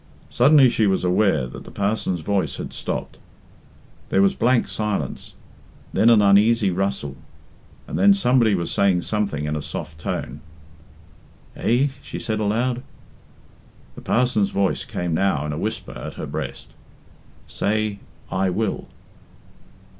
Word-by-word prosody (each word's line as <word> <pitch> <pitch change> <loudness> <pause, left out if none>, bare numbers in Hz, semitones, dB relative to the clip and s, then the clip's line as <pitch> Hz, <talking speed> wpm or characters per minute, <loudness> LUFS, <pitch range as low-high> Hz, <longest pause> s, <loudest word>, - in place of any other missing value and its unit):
Suddenly 140 +2 +6
she 110 -2 +1
was 95 -1 +1
aware 90 -6 +2
that 65 - -9
the - - -12
parson's 100 -4 -1
voice 100 +2 -1
had - - -6
stopped. - - -4 0.9
There 95 - +3
was 100 - +3
blank 120 +1 +2
silence, 105 -10 -3 0.6
then 115 - +4
an 110 -3 +6
uneasy 100 +1 +4
rustle, 95 -7 -2 0.7
and - - -3
then 200 +1 +6
somebody 125 - +3
was 85 -2 -2
saying 95 -3 +2
something 100 -9 -1
in 75 0 -2
a 75 - -3
soft 75 +1 -7
tone. 70 -2 -4 1.1
"Eh?" 130 +5 +2
she - - -7
said 110 -1 -2
aloud. 120 +4 0 1.1
The - - -11
parson's 120 -5 +1
voice 100 -1 0
came 90 -2 -3
now 80 -4 +1
in 75 - -3
a - - -4
whisper - - -4
at - - -7
her - - -5
breast - - -6 0.8
"Say, 105 -1 -1 0.3
'I 95 +1 +1
will.'" 100 +2 -2
100 Hz, 140 wpm, -22 LUFS, 90-110 Hz, 1.1 s, Suddenly